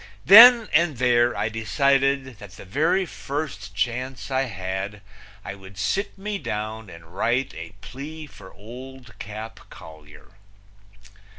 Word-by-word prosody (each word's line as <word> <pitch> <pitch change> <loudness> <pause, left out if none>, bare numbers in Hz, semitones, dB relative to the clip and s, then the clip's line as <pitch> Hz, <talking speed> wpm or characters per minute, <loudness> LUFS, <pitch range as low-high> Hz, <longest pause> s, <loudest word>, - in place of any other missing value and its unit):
Then 230 +3 +9
and 155 -3 +2
there 120 -1 +2
I - - 0
decided 135 +2 0
that 100 -3 -12
the 100 - -12
very 155 - +1
first 140 - -6
chance 125 +6 -3
I 130 +1 +1
had 95 -1 -5 0.4
I - - -5
would 95 -1 -14
sit 190 - -2
me 205 +1 -4
down 110 - -5
and 85 0 -14
write 125 +6 0
a 80 +3 -9
plea 155 +4 -9
for 100 -9 -15
Old 125 0 -12
Cap 110 +2 -8
Collier. 75 +1 -15
120 Hz, 130 wpm, -23 LUFS, 100-140 Hz, 0.4 s, Then